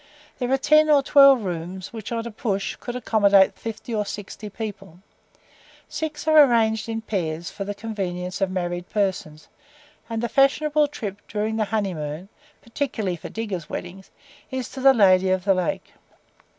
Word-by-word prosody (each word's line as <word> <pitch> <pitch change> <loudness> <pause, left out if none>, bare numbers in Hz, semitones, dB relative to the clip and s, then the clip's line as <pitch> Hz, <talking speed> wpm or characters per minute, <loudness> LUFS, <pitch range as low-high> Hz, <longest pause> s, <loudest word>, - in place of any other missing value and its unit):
There 250 -1 -2
are 270 - +4
ten 305 +3 +4
or 285 -2 +5
twelve 275 -4 +6
rooms 180 +1 -5
which, 220 -1 -7
on 230 -1 -2
a 235 - -5
push, 200 -3 -2
could 245 - -7
accommodate 200 -5 +4
fifty 225 +1 -7
or 210 -1 0
sixty 205 +1 -7
people; 195 -4 -7 0.9
six 310 -1 -5
are 310 -1 +8
arranged 225 -3 +1
in 225 0 -3
pairs 170 -6 -3
for 200 - -6
the 205 0 -4
convenience 190 -4 -4
of 195 - +2
married 175 -1 -3
persons, 185 -7 -2 0.6
and 225 0 -3
the - - +1
fashionable 295 +4 +3
trip 205 -9 -7
during 215 +1 -2
the 215 - +1
honey 205 -2 -1
moon 155 +4 -6 0.3
(particularly 230 -6 -3
for 165 - -9
diggers' 200 -8 -5
weddings) 185 +2 -7 0.4
is 260 -1 -4
to 270 - -9
the 270 0 +6
"Lady 190 -3 +5
of 185 0 0
the 195 - +4
Lake." 185 -2 -3
210 Hz, 165 wpm, -23 LUFS, 185-240 Hz, 0.9 s, are